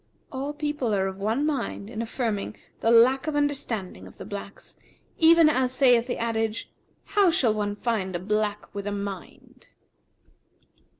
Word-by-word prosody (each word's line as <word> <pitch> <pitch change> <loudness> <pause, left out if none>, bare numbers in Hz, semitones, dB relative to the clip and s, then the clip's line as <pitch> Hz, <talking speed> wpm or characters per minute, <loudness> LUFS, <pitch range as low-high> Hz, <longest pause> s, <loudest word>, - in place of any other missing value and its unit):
[FN#360] 260 - -5
All 285 +2 -3
people 295 -7 -1
are 190 -1 +1
of 190 0 -5
one 220 +8 0
mind 270 -8 -2
in 225 0 -5
affirming 225 -3 -3 0.2
the 225 - +1
lack 250 +5 +5
of 310 - -1
understanding 230 - -2
of - - -16
the - - -8
blacks, 200 0 -8 0.4
even 330 0 +7
as 260 -4 +2
saith 250 -3 +4
the 245 - -2
adage, 225 -1 -2 0.4
'How 405 -3 +4
shall 265 - +2
one 205 -1 -2
find 205 -5 -2
a - - -1
black 210 +2 -2
with 200 0 -5
a - - -1
mind?' 200 -2 -7
230 Hz, 165 wpm, -26 LUFS, 205-270 Hz, 0.4 s, even